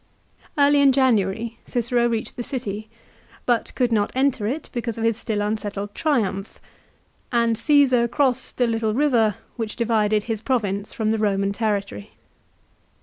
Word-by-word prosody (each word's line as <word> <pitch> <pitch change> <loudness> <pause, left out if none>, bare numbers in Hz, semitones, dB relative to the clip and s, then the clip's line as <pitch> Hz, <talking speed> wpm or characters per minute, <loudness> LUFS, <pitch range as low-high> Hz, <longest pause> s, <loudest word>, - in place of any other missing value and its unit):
Early 285 0 +5
in 275 -1 +6
January 230 -3 +1
Cicero 240 0 +1
reached 225 -1 -3
the 240 - -4
city, 220 -4 -5 0.6
but 240 -2 +1
could 245 -2 +1
not 210 -2 +1
enter 260 -5 +1
it 280 +7 -3
because 235 -2 -3
of 225 - -3
his 230 -1 +2
still 210 -2 -2
unsettled 205 -1 -3
triumph, 215 -10 -1 0.7
and 235 -2 +2
Caesar 260 -3 +3
crossed 260 +1 0
the 245 - +3
little 225 -2 0
river 235 -7 +3 0.2
which 225 -2 -4
divided 215 -3 +1
his 225 -2 -3
province 205 -6 -1
from 220 -4 -1
the 220 - 0
Roman 200 -2 +1
territory. 200 - -3
230 Hz, 145 wpm, -23 LUFS, 210-250 Hz, 0.7 s, in